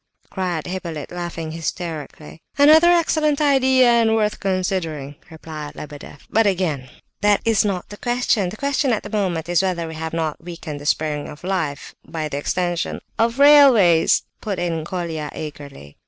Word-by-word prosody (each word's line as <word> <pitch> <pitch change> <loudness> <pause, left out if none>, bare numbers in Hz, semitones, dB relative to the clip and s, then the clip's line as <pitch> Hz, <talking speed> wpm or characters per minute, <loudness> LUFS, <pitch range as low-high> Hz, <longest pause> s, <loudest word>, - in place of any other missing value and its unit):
cried 180 -5 -3
Hippolyte, 170 -5 -5
laughing 170 -2 -5
hysterically. 160 -2 -6 0.2
"Another 310 +4 +7
excellent 315 -4 +2
idea, 265 -3 +4
and 230 -2 +4
worth 215 -1 0
considering!" 180 -7 -2
replied 155 -2 -8
Lebedeff. 145 -1 -10
"But, 225 -1 +2
again, 165 -9 -1 0.3
that 205 0 +4
is 225 -2 +3
not 195 -4 -2
the 205 - -9
question. 240 -5 0
The 215 - -9
question 280 -1 0
at 215 - -2
this 205 - -8
moment 180 -6 -1
is 175 0 +2
whether 180 -3 -1
we 160 - -7
have 160 0 -5
not 160 -1 -3
weakened 165 -4 -7
'the 145 - -7
springs 150 -1 -1
of 150 +2 -12
life' 170 -6 -3
by 160 -1 -4
the 140 - -4
extension..." 175 +2 -2 0.2
"Of 230 +2 +1
railways?" 270 - +6 0.2
put 200 -3 -3
in 165 -3 -2
Colia 165 -4 -4
eagerly. 140 - -9
175 Hz, 160 wpm, -21 LUFS, 155-215 Hz, 0.3 s, Another